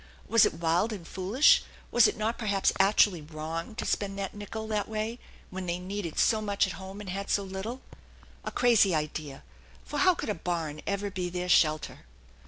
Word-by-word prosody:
Was 230 -1 +6
it - - -5
wild 170 +6 +1
and 185 -6 -7
foolish, 250 - +4 0.3
was 240 - +6
it - - -2
not 220 +2 -1
perhaps 200 -4 +1
actually 195 -3 +4
wrong, 160 +6 -6
to - - -4
spend 200 -1 -1
that 195 -1 -4
nickel 215 +2 -6
that 210 -1 -1
way 220 +2 -3 0.3
when 185 0 -5
they 170 0 -1
needed 180 -2 -5
so 220 -2 +3
much 205 -1 +1
at 185 - -4
home, 195 +1 -8
and 200 - -8
had 195 +1 -4
so 200 - +1
little? 195 +7 -6 0.6
A - - -3
crazy 220 -7 +4
idea, 150 - -4 0.4
for 295 - -4
how 370 -1 +5
could - - -5
a - - +1
barn 160 -4 -3
ever 200 0 -2
be 180 -2 -3
their 180 0 -3
shelter? 155 - +2
195 Hz, 190 wpm, -28 LUFS, 175-215 Hz, 0.6 s, Was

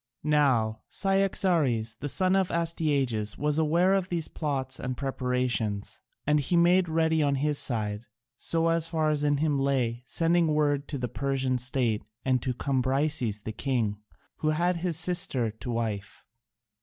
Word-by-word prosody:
Now 130 -8 +2
Cyaxares, 170 - +1
the 145 - -4
son 185 +5 +2
of 190 -2 +2
Astyages, 140 -10 0
was 150 +1 +1
aware 170 +5 +3
of 190 -2 0
these 170 -3 0
plots 135 -4 -3
and 125 -1 -4
preparations, 125 -6 -2 0.3
and 150 0 +3
he 170 +5 0
made 175 +1 +4
ready 160 0 +2
on 140 -1 +2
his 145 +1 +1
side, 110 -2 0 0.3
so 165 0 +1
far 160 -1 0
as 150 -1 -1
in 145 -1 +2
him 145 -1 +1
lay, 130 -4 0
sending 170 +2 +2
word 145 -2 +1
to 145 - -4
the 125 -1 -2
Persian 135 0 -1
state 125 -3 +2 0.2
and 130 -2 +2
to 125 0 -2
Cambyses 130 -4 0
the 110 - -4
king, 110 -3 -1 0.4
who 155 - 0
had 170 +3 +1
his 170 -2 -2
sister 160 -9 0
to 110 +4 -9
wife. 110 -4 -4
140 Hz, 155 wpm, -27 LUFS, 125-165 Hz, 0.4 s, made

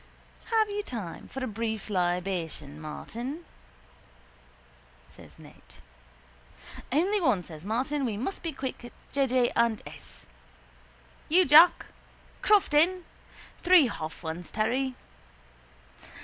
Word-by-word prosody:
—Have 445 -2 +2
you 410 0 -2
time 220 - -7
for 270 - -6
a - - -1
brief 220 0 -4
libation, 175 -6 -2
Martin? 240 - -6 1.6
says - - -16
Ned. - - -16 1.3
—Only 375 +9 +2
one, 240 - +2
says 160 +2 -11
Martin. 270 +6 -1
We 225 -5 -2
must 325 - -4
be 330 - -3
quick. 260 -3 -6 0.2
J. 275 -1 +1
J. 250 -1 +2
and 235 -2 +2
S. 60 0 -11 1.0
—You, 360 +4 +5
Jack? 310 +5 +7 0.6
Crofton? 365 -3 +3 0.6
Three 360 -4 +6
half 160 -2 -7
ones, 165 +2 -5
Terry. 250 +4 -1
245 Hz, 105 wpm, -28 LUFS, 185-310 Hz, 1.6 s, Jack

